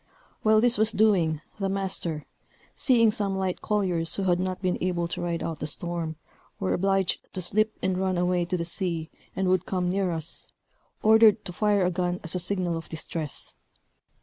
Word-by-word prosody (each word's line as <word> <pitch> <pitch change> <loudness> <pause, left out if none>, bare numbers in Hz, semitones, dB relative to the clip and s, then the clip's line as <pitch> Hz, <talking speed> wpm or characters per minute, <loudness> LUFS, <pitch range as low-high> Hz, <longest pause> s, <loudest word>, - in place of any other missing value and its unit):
While 215 0 +4
this 240 -2 +3
was 220 +1 +3
doing, 180 -8 +3 0.2
the 195 -1 0
master 185 -5 -2 0.5
seeing 230 -4 +4
some 200 -2 -1
light 190 -1 -2
colliers, 180 -6 +2
who, 190 -3 +2
not 185 0 -2
able 180 -1 0
to - - -5
ride 170 -1 -2
out 160 -2 -4
the 150 - -2
storm, 165 0 -3 0.4
were 195 - 0
obliged 195 0 +1
to - - -4
slip, 215 +4 +1
and 185 -1 0
run 190 -1 0
away 180 0 +1
to 180 +1 -2
the 170 - -3
sea, 170 -2 -1 0.2
and 190 - 0
would 185 -1 +1
come 180 -2 0
near 190 -1 0
us, 160 -1 -5 0.6
ordered 220 -1 +6
to 180 - -6
fire 205 0 +2
a 180 - +1
gun 180 0 -1
as 165 - -4
a 180 - -1
signal 180 -1 -1
of 165 - -8
distress. 160 -2 -5
185 Hz, 180 wpm, -26 LUFS, 170-195 Hz, 0.6 s, ordered